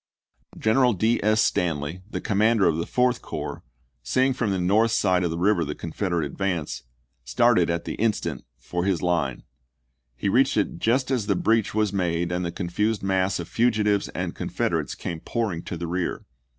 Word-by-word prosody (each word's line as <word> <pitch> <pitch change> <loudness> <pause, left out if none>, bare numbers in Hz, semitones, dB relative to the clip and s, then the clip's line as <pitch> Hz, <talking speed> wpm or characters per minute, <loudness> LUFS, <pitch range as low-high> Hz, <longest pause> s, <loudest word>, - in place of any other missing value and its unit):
General 120 +3 +3
D. 110 +5 +1
S. 110 +1 +3
Stanley, 80 0 -1
the - - -4
commander 110 -1 +2
of 80 - +1
the 85 - -3
Fourth 125 0 +1
Corps, - - -5 0.4
seeing 130 - +2
from 120 -4 -1
the 95 - 0
north 105 +6 +3
side 95 -4 +2
of 85 - +1
the 80 - -3
river 90 0 +2
the 75 -1 -4
Confederate 85 -1 -2
advance, 85 +1 -3 0.4
started - - +3
at 85 0 -2
the - - -3
in 115 -1 +4
stant 80 - -5
for 90 0 -3
his 95 -3 0
line. 80 -7 0 0.7
He - - -3
reached 130 +6 +3
it 100 -5 0
just 130 +6 +1
as 120 -6 0
the 100 - +2
breach 110 +2 +1
was 105 -2 +1
made 85 -2 0
and 90 +1 -1
the 85 - -2
confused 100 +5 -1
mass 95 -1 +1
of 85 - -5
fugitives 105 -4 +1
and - - -4
Confederates - - -2
came 85 -2 -5
pouring 105 -4 -2
to 90 - -5
the 85 - -4
rear. 90 +1 -3
95 Hz, 185 wpm, -25 LUFS, 85-110 Hz, 0.7 s, in